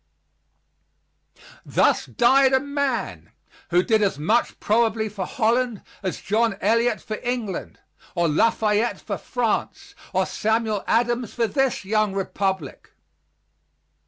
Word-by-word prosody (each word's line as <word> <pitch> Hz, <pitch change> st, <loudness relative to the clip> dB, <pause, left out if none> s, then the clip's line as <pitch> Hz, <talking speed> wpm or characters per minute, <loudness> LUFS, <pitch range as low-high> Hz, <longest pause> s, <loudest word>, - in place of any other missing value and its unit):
Thus -, -, +2 dB
died 265 Hz, +1 st, +4 dB
a 265 Hz, -, +5 dB
man 265 Hz, -, -3 dB, 0.4 s
who 175 Hz, +2 st, +3 dB
did 220 Hz, 0 st, +2 dB
as 195 Hz, -8 st, +1 dB
much 215 Hz, +11 st, 0 dB
probably 220 Hz, 0 st, +1 dB
for 195 Hz, -3 st, -5 dB
Holland 240 Hz, -2 st, 0 dB, 0.2 s
as 190 Hz, -2 st, -3 dB
John 220 Hz, 0 st, +1 dB
Eliot 230 Hz, +2 st, +2 dB
for 215 Hz, -, -5 dB
England, 240 Hz, -6 st, -4 dB, 0.4 s
or 175 Hz, -1 st, +2 dB
Lafayette 215 Hz, +6 st, +1 dB
for 200 Hz, -3 st, -5 dB
France, 240 Hz, -3 st, -2 dB, 0.2 s
or -, -, +1 dB
Samuel 220 Hz, -1 st, -1 dB
Adams 240 Hz, 0 st, 0 dB
for 235 Hz, -, +2 dB
this 270 Hz, -3 st, 0 dB
young 215 Hz, 0 st, +1 dB
republic. 190 Hz, -5 st, -3 dB
220 Hz, 115 wpm, -23 LUFS, 200-240 Hz, 0.4 s, a